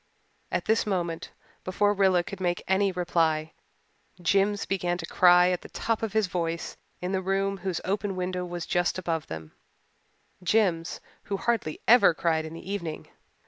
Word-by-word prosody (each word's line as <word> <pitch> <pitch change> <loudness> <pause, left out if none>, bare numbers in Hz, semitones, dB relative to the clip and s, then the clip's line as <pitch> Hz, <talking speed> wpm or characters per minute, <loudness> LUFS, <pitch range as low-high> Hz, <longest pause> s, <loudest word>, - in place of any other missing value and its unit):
At - - -1
this 220 0 +2
moment, 175 -4 -2 0.3
before 205 +2 +2
Rilla 190 -3 +3
could 195 +1 -8
make 175 -1 -1
any 195 +1 +2
reply, 165 -3 0 0.7
Jims 195 +4 +2
began 175 -2 -1
to 170 - -5
cry 180 +1 +5
at 180 - -1
the - - -11
top 225 -1 -2
of 220 -3 -3
his 220 -1 +3
voice 170 -2 -3 0.3
in 180 +1 -2
the 190 -1 0
room 195 +1 0
whose 185 -2 -3
open 200 0 -1
window 180 0 -2
was 175 -1 -5
just 175 +1 0
above 165 -3 -2
them 80 -1 -7 0.9
Jims, 180 -3 +1 0.2
who 200 - -2
hardly 225 -9 -1
ever 210 -8 +7
cried 160 -2 0
in 160 - -7
the 165 - -10
evening. 180 -6 -4
180 Hz, 165 wpm, -27 LUFS, 170-195 Hz, 0.9 s, ever